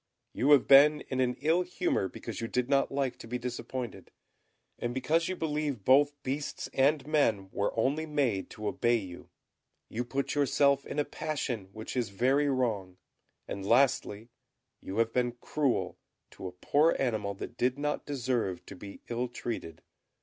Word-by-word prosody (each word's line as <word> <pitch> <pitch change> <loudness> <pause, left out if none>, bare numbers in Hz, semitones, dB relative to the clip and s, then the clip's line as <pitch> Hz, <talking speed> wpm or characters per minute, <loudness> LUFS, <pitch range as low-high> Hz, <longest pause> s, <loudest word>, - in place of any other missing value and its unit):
You 135 - +1
have 140 - +5
been 150 +2 +7
in 130 - -2
an 125 -1 +1
ill 160 +4 +3
humour 180 - -1
because 115 +3 -7
you 115 - -2
did 125 +1 -1
not 140 0 +2
like 135 -2 -1
to - - -10
be 125 +2 -2
disappointed, 125 0 -5 0.7
and 120 +1 -3
because 160 +6 +1
you 185 - -1
believe 150 - -2
both 145 +2 +5
beasts 140 +3 -3
and 140 +1 +3
men 115 -11 +1
were 100 - 0
only 145 +7 +1
made 135 -10 0
to 105 -1 -6
obey 120 +2 +2
you. 95 -6 -6 0.6
You 120 +3 -2
put 135 +3 -2
yourself 140 -1 +2
in - - -6
a 145 - +2
passion, 125 -10 -3
which 110 +4 -7
is 120 -4 0
very 135 +8 +2
wrong, 110 -9 -1 0.5
and, 100 - -5
lastly, 115 -1 +2 0.5
you 95 - -6
have 115 0 +2
been 125 -1 +1
cruel 145 -2 -1 0.3
to 95 - -7
a - - -6
poor 145 - +2
animal 110 -6 -1
that 120 - -7
did 125 +2 +1
not 150 +1 -2
deserve 120 -10 -1
to - - -10
be 100 +2 -10
ill 120 +1 -2
treated. 115 -9 -6
125 Hz, 170 wpm, -30 LUFS, 110-145 Hz, 0.7 s, been